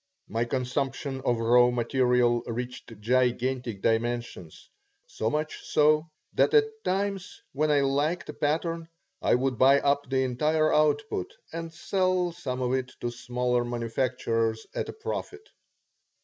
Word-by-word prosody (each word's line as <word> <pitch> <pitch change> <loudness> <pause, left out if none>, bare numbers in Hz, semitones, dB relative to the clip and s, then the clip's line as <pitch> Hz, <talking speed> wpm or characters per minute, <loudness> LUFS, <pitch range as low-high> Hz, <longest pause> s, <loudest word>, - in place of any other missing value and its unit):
My 115 +2 -1
consumption 135 +2 -2
of 120 - +2
raw 120 +2 +5
material 125 0 +2
reached 120 -2 -6
gigantic 125 -1 0
dimensions, 115 -7 -2 0.4
so 110 - -2
much 150 +4 -3
so 155 +2 +3 0.2
that 445 - +3
at 440 0 +2
times, 195 0 -2
when 155 +3 +1
I 145 -1 +4
liked 145 +5 0
a - - -6
pattern, 165 +2 -1 0.3
I - - +3
would 125 -1 -1
buy 135 +2 +6
up 140 -1 +1
the 130 0 +2
entire 155 +5 +1
output 150 -9 +1 0.2
and 165 0 -5
sell 185 +1 0
some 130 -7 -4
of 125 0 0
it 130 -1 -2
to 120 - -2
smaller 125 0 -1
manufacturers 115 -1 -1
at - - -3
a - - -5
profit. 435 -1 -6
130 Hz, 135 wpm, -27 LUFS, 120-155 Hz, 0.4 s, buy